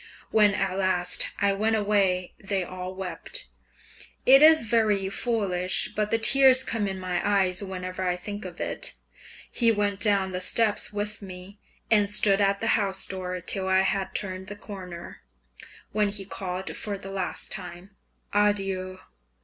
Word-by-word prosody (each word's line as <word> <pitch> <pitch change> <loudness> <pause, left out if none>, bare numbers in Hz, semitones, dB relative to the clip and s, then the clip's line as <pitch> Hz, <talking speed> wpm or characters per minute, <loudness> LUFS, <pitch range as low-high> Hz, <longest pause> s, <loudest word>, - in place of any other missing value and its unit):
When 210 -2 +4
at 190 -1 -1
last 180 -2 +2
I 200 -1 +2
went 220 +3 0
away 200 -4 +1
they 195 -1 -1
all 185 +1 -7
wept. 190 - -5 0.8
It 270 +2 +8
is 315 -4 +7
very 210 -4 +1
foolish, 195 -5 0
but 210 0 0
the 225 - +2
tears 260 +2 +5
come 220 -5 -2
in 190 -1 -4
my 180 -1 -2
eyes 190 -3 +1
whenever 185 -1 -6
I 180 -1 0
think 205 +3 -7
of 180 -2 -9
it. - - -3 0.6
He 230 -2 +3
went 205 -2 -1
down 200 -3 +1
the 180 0 -4
steps 215 +2 +2
with 210 +1 -2
me, 190 +1 -10 0.3
and 205 -2 +4
stood 205 -1 +4
at 200 0 +1
the - - 0
house 195 -1 0
door 185 -1 -5
till 190 +2 -2
I 190 0 +3
had 190 0 -2
turned 190 -1 -5
the 205 - -7
corner, 185 -4 -9 0.7
when 210 -1 +1
he 200 -1 -5
called 185 -1 -5
for 205 -2 -4
the 195 0 -9
last 190 -2 -3
time, 180 +1 -6 0.4
"Adieu!" 195 -2 0
195 Hz, 160 wpm, -26 LUFS, 185-210 Hz, 0.8 s, It